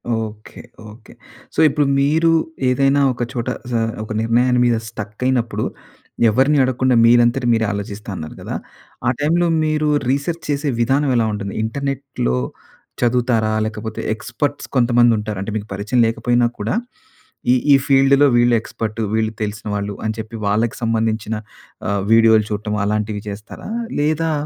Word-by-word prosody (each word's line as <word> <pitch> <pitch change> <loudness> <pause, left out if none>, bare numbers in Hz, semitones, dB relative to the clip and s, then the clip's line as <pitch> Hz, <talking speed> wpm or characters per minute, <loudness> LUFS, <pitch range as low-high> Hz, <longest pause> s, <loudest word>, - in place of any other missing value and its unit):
Okay. 110 -1 -6 0.3
Okay. 110 +2 -15 0.4
So, - - -1
ఇప్పుడు 145 +1 +1
మీరు 160 +4 +3 0.4
ఏదైనా 135 +2 +3
ఒక 120 - -3
చోట 120 0 -3 0.2
జ - - -3 0.3
ఒక 110 - -9
నిర్ణయాన్ని 125 +2 +2
మీద 120 -1 +3
స్టక్ 105 0 -8
అయినప్పుడు 125 -3 0 0.7
ఎవరిని 135 +7 +3
అడగకుండా 130 0 +1
మీరంతటి 120 +1 +4
మీరే 110 -1 +1
ఆలోచిస్తా 100 +1 -6
అన్నారు 80 -3 -7
గదా! - - -5 0.5
ఆ - - +5
టైమ్‌లో 170 +4 +2 0.2
మీరు 155 0 0 0.2
రీసెర్చ్ 140 +5 -1
చేసే 145 0 0
విధానం 135 +4 +2
ఎలా 115 -2 +3
ఉంటుంది? 100 -1 -4
ఇంటర్నెట్‌లో 135 - -2 0.6
చదువుతారా? 120 -2 +2
లేకపోతే 110 0 -5
ఎక్స్‌పర్ట్స్ 120 +6 -3
కొంతమందుంటారు. 120 -4 +3
అంటే 100 - -4
మీకు 105 - -6
పరిచయం 105 +5 -1
లేకపోయినా 120 +1 +1
కూడా 105 - -1 0.8
ఈ - - +5 0.2
ఈ - - +9
ఫీల్డ్‌లో 140 +1 +5
వీళ్ళు 120 0 +4
ఎక్స్‌పర్టు. 110 -1 -5
వీళ్ళు 110 0 0
తెలిసిన 105 +1 -5
వాళ్ళు 100 0 -3
అని 110 - -1
చెప్పి 110 +1 -7
వాళ్ళకి 110 +3 0
సంబంధించిన 110 -1 0 0.5
ఆహ్, 100 -1 0
వీడియోలు 110 -2 +5
చూడటం 105 0 -2
అలాంటివి 105 0 -1
జేస్తారా? 105 - -9 0.3
లేదా 155 +2 +1
115 Hz, 140 wpm, -19 LUFS, 110-135 Hz, 0.8 s, ఈ